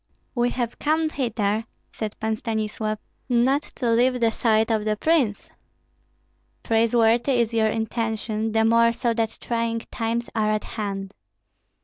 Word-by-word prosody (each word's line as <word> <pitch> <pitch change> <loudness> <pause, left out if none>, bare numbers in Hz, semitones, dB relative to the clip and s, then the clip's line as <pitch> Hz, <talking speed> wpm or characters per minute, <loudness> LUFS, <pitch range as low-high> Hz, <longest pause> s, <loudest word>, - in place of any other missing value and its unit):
"We 240 -1 +1
have 245 -2 -3
come 315 +1 +1
hither," 220 -5 -1 0.3
said 215 -1 -5
Pan 220 0 0
Stanislav, 215 -1 -2 0.3
"not 255 +4 +3
to 240 -3 0
leave 250 +2 +3
the 230 -1 +3
side 220 0 +2
of 215 -1 +1
the 215 0 0
prince." 275 -8 +1 1.1
"Praiseworthy 230 +3 +3
is 235 -2 +1
your 220 -1 +3
intention, 220 0 -2
the 220 0 +2
more 230 +1 +4
so 235 0 0
that 225 -1 -1
trying 230 -1 -1
times 230 +1 -2
are 215 -1 +1
at 215 - -1
hand." 195 -2 -5
225 Hz, 140 wpm, -24 LUFS, 220-240 Hz, 1.1 s, more